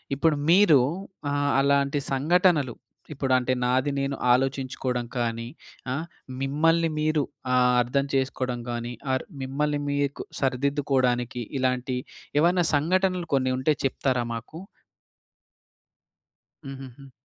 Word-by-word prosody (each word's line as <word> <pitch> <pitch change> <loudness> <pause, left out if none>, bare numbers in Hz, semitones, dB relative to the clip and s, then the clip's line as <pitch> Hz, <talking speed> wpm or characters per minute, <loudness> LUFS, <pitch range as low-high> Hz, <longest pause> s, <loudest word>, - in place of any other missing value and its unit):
ఇప్పుడు 150 +2 +2
మీరు 170 -5 +6 0.5
ఆహ్, 145 0 +1
అలాంటి 140 +1 +2
సంఘటనలు, 155 -2 +2 0.4
ఇప్పుడు 135 -2 -1
అంటే 130 0 0
నాది 130 +3 +2
నేను 135 0 -1 0.2
ఆలోచించుకోవడం 130 -1 -1
కానీ, 115 -1 -2 0.5
ఆ! - - -1 0.5
మిమ్మల్ని 165 +4 +2
మీరు 155 -1 +2 0.6
అర్థం 140 +3 0
చేసుకోవడం 130 -2 -1
కానీ 120 0 -4 0.2
ఆర్ 130 - 0 0.2
మిమ్మల్ని 145 +2 -1
మీకు 145 0 -1 0.2
సరిదిద్దుకోవడానికి 130 -3 0 0.2
ఇలాంటి 130 0 0 0.4
ఏవన్నా 175 +2 +3
సంఘటనలు 180 +4 +1
కొన్ని 130 -1 +2
ఉంటే 150 +4 +2
చెప్తారా 130 -2 0
మాకు? 125 +8 -8 2.1
హుహుహు. 135 0 -10
135 Hz, 100 wpm, -26 LUFS, 130-150 Hz, 2.1 s, మీరు